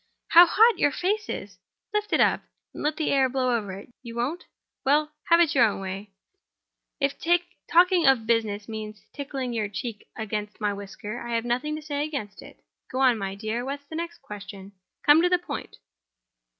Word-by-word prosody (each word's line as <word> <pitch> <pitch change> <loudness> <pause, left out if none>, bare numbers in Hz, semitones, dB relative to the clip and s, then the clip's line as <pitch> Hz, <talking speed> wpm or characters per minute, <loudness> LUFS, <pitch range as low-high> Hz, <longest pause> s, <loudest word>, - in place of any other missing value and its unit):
How 345 +1 +9
hot 445 +3 +5
your 290 - +4
face 420 +8 -1
is! - - -6 0.3
Lift 420 0 -1
it - - +3
up, - - +4 0.3
and - - -8
let 300 +1 0
the 315 - 0
air 270 -2 +3
blow 255 -1 +1
over 205 -4 -3
it. 200 +5 -11
You 235 -2 -9
won't? 275 +10 -2 0.4
Well—have 305 +3 +3
your 255 - +5
own 210 - -1
way. 195 +2 -6 0.9
If 275 -1 0 0.5
talking 350 -2 +5
of 260 -5 +4
business 220 -3 0
means 215 -2 -7
tickling 270 -3 -4
your 215 -3 -1
cheek 215 +1 -6
against 210 -1 -4
my 210 -2 0
whisker 200 +3 -7
I've 235 -1 -2
nothing 255 +6 -1
to 310 - -7
say 290 -1 -2
against 280 -10 -5
it. - - -15 0.3
Go 255 - -2
on, 260 -3 +5
my 195 0 -3
dear. 220 +4 -3
What's 280 +2 -5
the 315 - -9
next 340 +1 -5
question? 200 -1 -9 0.3
Come 295 +2 +7
to 355 - +3
the 360 - +4
point." 350 - -7
255 Hz, 180 wpm, -26 LUFS, 215-305 Hz, 0.9 s, How